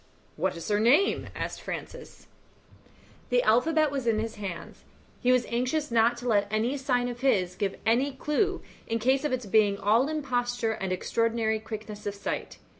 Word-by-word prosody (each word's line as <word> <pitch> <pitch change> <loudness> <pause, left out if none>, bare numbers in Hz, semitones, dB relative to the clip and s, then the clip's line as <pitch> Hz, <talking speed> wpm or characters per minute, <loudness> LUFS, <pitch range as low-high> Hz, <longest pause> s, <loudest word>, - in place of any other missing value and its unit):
"What 180 +2 -1
is 165 - -7
her 205 0 +2
name?" 255 - +3
asked - - -4
Francis. - - -8 1.0
The 245 0 +3
alphabet 305 +7 +3
was 270 -4 -3
in 225 -2 +3
his 220 0 -3
hands; 190 -5 -7 0.4
he 250 - +3
was 250 -1 +3
anxious 255 +5 -1
not 230 +1 +3
to 245 +1 -6
let 205 -3 +3
any 225 +5 0
sign 250 -3 0
of 245 -1 -5
his 195 -9 +2
give 195 +1 -2
any 250 +5 +2
clue 370 +8 -1 0.2
in 230 - 0
case 260 +5 +2
of 300 - -1
its 255 -2 -2
being 205 -1 +3
all 225 +7 +3
imposture 245 -6 -1
and 190 -4 -3
extraordinary 225 +3 0
quickness 215 -1 -7
of 205 - -3
sight. 200 - -4
235 Hz, 175 wpm, -28 LUFS, 215-260 Hz, 1.0 s, name